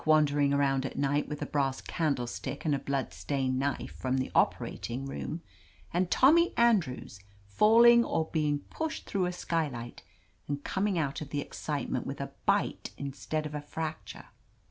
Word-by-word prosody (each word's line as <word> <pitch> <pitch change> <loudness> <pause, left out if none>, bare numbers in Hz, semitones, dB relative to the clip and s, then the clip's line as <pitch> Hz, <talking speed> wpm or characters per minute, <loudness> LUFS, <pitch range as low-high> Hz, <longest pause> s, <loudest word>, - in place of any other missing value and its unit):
wan; 155 -1 +5
dering 145 -1 +1
around 140 -1 +2
at 135 - -5
night 145 +1 +1
with 150 -1 -4
a - - -2
brass 135 -2 0
candlestick 140 -2 -2
and 150 - +2
a 140 - +1
blood 140 -2 -2
stained 130 -2 -1
knife 140 +1 -2
from 130 0 -1
the 130 - -2
operating 125 +3 0
room, 155 +4 -5 0.5
and 175 +1 +1
Tommy 335 - +5
Andrews 190 - +2 0.3
falling 230 - +6
or 160 -8 0
being 150 -2 +1
pushed 320 0 -3
through 190 -3 0
a - - -1
skylight 150 -9 -3 0.5
and 145 0 -3
coming 195 -1 0
out 145 -3 -1
of 150 - -6
the 145 - -2
excitement - - -3
with - - -5
a - - -4 0.2
bite - - +1
instead 140 +3 -3
of 150 - -5
a 150 - -3
fracture 155 +2 -6
145 Hz, 165 wpm, -30 LUFS, 135-170 Hz, 0.5 s, falling